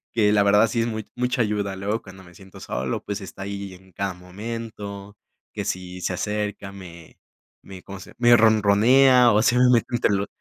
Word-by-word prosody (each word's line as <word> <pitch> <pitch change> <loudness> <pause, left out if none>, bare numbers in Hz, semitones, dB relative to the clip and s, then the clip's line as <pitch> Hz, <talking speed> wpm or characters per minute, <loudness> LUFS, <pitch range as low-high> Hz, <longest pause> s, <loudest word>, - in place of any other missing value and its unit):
Que 105 -3 +3
la 105 -1 +4
verdad 105 +2 +4
sí 115 - -2
es 115 - +1
mu 110 -1 -4 0.2
mucha 125 +1 0
ayuda. 105 -3 -1
Luego 100 +4 -3
cuando 95 -3 -14
me 85 - -17
siento 95 +2 -15
solo, 65 0 -4
pues 100 0 -4
está 95 -1 -10
ahí 100 -1 -6
en 95 +1 -17
cada 95 +2 -3
momento, 100 +1 -8 0.3
que - - -5
si 90 0 -5
se 90 - -2
acerca, 105 +1 -4
me 85 -4 -13 0.4
me, 95 -2 -12
¿cómo 100 -1 -9
se?, - - -13
me 120 -1 +6
ronronea 115 +4 +5
o 105 - +3
se 125 +1 +2
me 125 0 +5
mete 115 - +2
entre 120 -3 +1
los 100 0 -1
100 Hz, 200 wpm, -23 LUFS, 95-115 Hz, 0.4 s, me